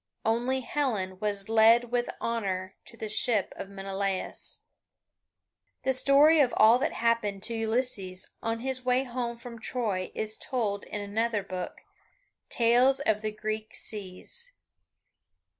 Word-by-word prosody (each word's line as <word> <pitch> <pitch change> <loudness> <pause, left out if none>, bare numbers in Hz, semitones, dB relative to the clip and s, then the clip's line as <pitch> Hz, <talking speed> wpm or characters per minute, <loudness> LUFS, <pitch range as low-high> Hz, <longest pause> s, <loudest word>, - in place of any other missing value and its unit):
Only 240 +4 +1
Helen 220 -9 -2
was 200 -2 -2
led 225 +2 +5
with 245 0 0
honour 195 -5 -2
to 230 - -14
the 220 - -4
ship 215 -1 +1
of 195 - -7
Menelaus. 195 -1 -4 1.2
The 265 - +2
story 285 +4 +6
of 265 -4 +3
all 225 +3 +7
that 270 - 0
happened 215 -4 0
to 235 - -1
Ulysses 220 -5 -2
on 225 0 -2
his 260 0 -2
way 250 +1 +2
home 240 -2 -3
from 235 0 -9
Troy 215 -6 -2
is 215 0 -2
told 215 -6 -2
in 205 - -5
another 210 +1 -1
book, 185 -2 -6 0.7
"Tales 245 +3 +4
of 220 -6 +1
the 215 0 -2
Greek 215 +1 -4
Seas." 215 - -5
225 Hz, 135 wpm, -28 LUFS, 200-245 Hz, 1.2 s, all